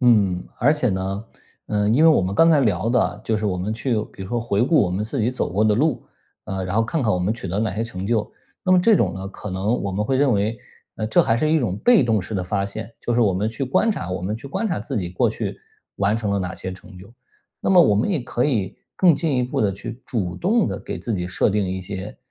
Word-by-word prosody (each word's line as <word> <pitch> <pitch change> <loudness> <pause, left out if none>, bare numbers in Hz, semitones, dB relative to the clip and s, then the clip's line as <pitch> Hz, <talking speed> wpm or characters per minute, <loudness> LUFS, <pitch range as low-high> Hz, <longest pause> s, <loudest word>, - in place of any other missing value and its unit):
嗯， 100 -8 +3
而 140 +5 +4
且 150 -5 0
呢， 95 +2 -2 0.4
呃， 105 -1 0
因 120 +8 +3
为 165 - +8
我 155 -11 +4
们 95 +2 -2
刚 165 +10 +5
才 155 -3 +5
聊 105 -4 +1
的， 115 -4 +1
就 110 - 0
是 105 - -3
我 95 -3 -1
们 95 +4 -2
去 120 +3 -1 0.2
比 - - -9
如 95 - -7
说 120 +1 -1
回 115 -1 0
顾 155 +5 +4
我 90 - +1
们 95 +4 -1
自 115 +4 -3
己 110 +3 +1
走 125 - -2
过 105 +4 +2
的 105 -1 +4
路， 130 -1 +1 0.4
呃， 95 -1 -4
然 90 +3 -2
后 115 - +4
看 145 +7 -1
看 110 -3 +2
我 90 - +1
们 90 +4 0
取 115 -5 -7
得 95 +4 -2
哪 110 -1 0
些 110 - -1
成 95 -5 -5
就？ 110 -1 0 0.3
那 185 - +2
么 185 - +6
这 215 +3 +5
种 - - +1
呢， 95 0 -6
可 105 +1 -8
能 100 +6 -1
我 100 - -2
们 100 +3 -1
会 130 +5 +1
认 135 -1 +3
为 105 +2 0 0.5
这 - - +5
还 115 - +2
是 155 +5 +1
一 160 - +4
种 110 -9 -1
被 240 - +5
动 110 -4 +2
式 95 +4 -6
的 95 -2 -1
发 100 +2 -1
现， 110 +2 -7
就 120 - -1
是 120 - +3
我 105 -5 +3
们 100 +4 0
去 115 +5 -3
观 135 - +2
察 95 - -3
我 90 - -3
们 100 +5 -3
去 125 - -10
观 220 +11 -2
察 175 - -1
自 135 - -5
己 90 -5 -2
过 90 - +1
去 - - -4 0.4
完 100 +2 +1
成 110 -3 -2
了 100 - +1
哪 95 -1 -3
些 95 - -6
成 95 +1 -13
就。 100 +5 -14 0.5
那 - - 0
么 185 -2 +7
我 135 -11 +5
们 105 - +1
也 180 -8 0
可 120 0 -1
以 110 -10 -1 0.2
更 180 -4 +5
进 150 -4 0
一 - - +2
步 125 - -2
地 100 -2 +2
去 110 +5 -8
主 90 -7 -3
动 215 - +2
地 - - -4
给 - - -6
自 115 - -3
己 90 -2 -2
设 90 - +1
定 100 -1 0
一 95 +1 -3
些， 95 +2 -7
110 Hz, 305 characters per minute, -22 LUFS, 95-125 Hz, 0.5 s, 为